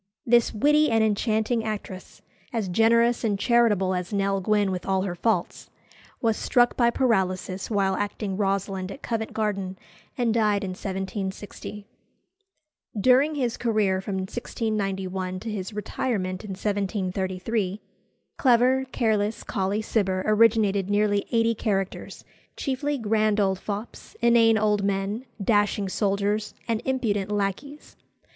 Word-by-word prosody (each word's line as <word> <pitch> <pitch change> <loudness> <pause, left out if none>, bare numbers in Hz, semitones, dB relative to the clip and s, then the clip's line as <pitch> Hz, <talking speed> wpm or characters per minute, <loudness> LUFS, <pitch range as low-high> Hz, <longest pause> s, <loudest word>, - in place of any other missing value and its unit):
This 235 -1 +4
witty 300 +7 +3
and 225 -1 +3
enchanting 220 +2 +1
actress, 205 -4 -6 0.3
as 220 -5 -2
generous 230 +5 +3
and 210 -3 +1
charitable 210 -4 +3
as 180 +1 -3
Nell 195 -1 0
Gwynn 205 0 +2
with 180 -1 -3
all 190 -1 +1
her 190 -3 -2
faults, 220 +6 -1 0.5
was 225 -2 +1
struck 245 -1 +2
by 235 -1 +4
paralysis 190 -6 0
while 195 -3 +1
acting 205 -1 -3
Rosalind 195 -1 -1
at 275 - -10
Covent 225 -2 -2
Garden, 195 -4 -2 0.4
and 240 -3 +1
died 210 -3 +2
in 190 - -3
1760. 195 +2 -5 1.1
During 260 +7 +4
his 250 -5 -1
career 210 -5 +1
from 195 0 -4
1691 190 -3 -3
to 225 - -5
his 195 -2 -4
retirement 205 -3 -3
in 210 - -8
1733, 195 0 -2 0.6
clever, 255 +1 +4
careless 215 -2 0
Colley 200 +2 -1
Cibber 190 -4 0
originated 215 -3 +3
nearly 205 0 +1
eighty 230 0 +3
characters, 195 -3 -3 0.3
chiefly 285 +1 -1
grand 215 -2 +1
old 190 -2 +1
fops, 210 +3 -7
inane 230 -1 +5
old 210 -1 +1
men, 200 +4 -1
dashing 205 -1 +1
soldiers, 205 +2 -1
and 230 -2 0
impudent 210 -7 -1
lacqueys. 210 +9 -3
210 Hz, 125 wpm, -25 LUFS, 195-230 Hz, 1.1 s, inane